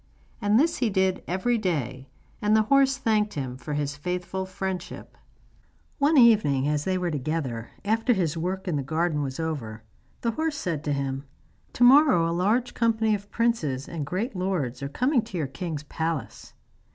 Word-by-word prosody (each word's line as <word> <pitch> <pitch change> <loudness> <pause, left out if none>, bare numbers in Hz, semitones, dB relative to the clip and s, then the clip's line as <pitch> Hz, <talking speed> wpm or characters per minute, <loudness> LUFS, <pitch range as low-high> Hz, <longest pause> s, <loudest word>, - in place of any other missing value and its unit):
And 205 +2 +3
this 325 +3 +2
he 240 - +1
did 190 -2 +1
every 225 +7 0
day, 135 - -2 0.3
and 210 +1 +3
the 215 - +4
horse 275 +2 +3
thanked 215 -4 +1
him 130 -4 -4
for 145 +3 -5
his 145 0 -2
faithful 180 +4 -3
friendship. 190 -1 -5 0.8
One 290 +2 +4
evening, 205 - +5
as 150 0 0
they 185 -1 +1
were 180 -2 -1
together, 140 -5 -3 0.2
after 225 +4 +2
his 170 -7 0
work 185 +4 -3
in 165 -5 0
the - - -1
garden 155 +2 0
was 135 0 -4
over, 120 -9 -4 0.4
the 230 - 0
horse 315 +4 -2
said 165 - -3
to 145 - 0
him: 135 0 -3 0.5
'To 245 - +1
morrow 260 - +6
a 165 - -1
large 215 +8 +1
company 225 -2 +2
of 205 0 -4
princes 165 - 0
and 165 -3 -4
great 195 - -3
lords 180 -10 -2
are 140 - -3
coming 250 - +2
to 215 -4 -7
your 155 - 0
king's 150 +2 -5
palace. 160 -1 -4
180 Hz, 175 wpm, -26 LUFS, 145-220 Hz, 0.8 s, morrow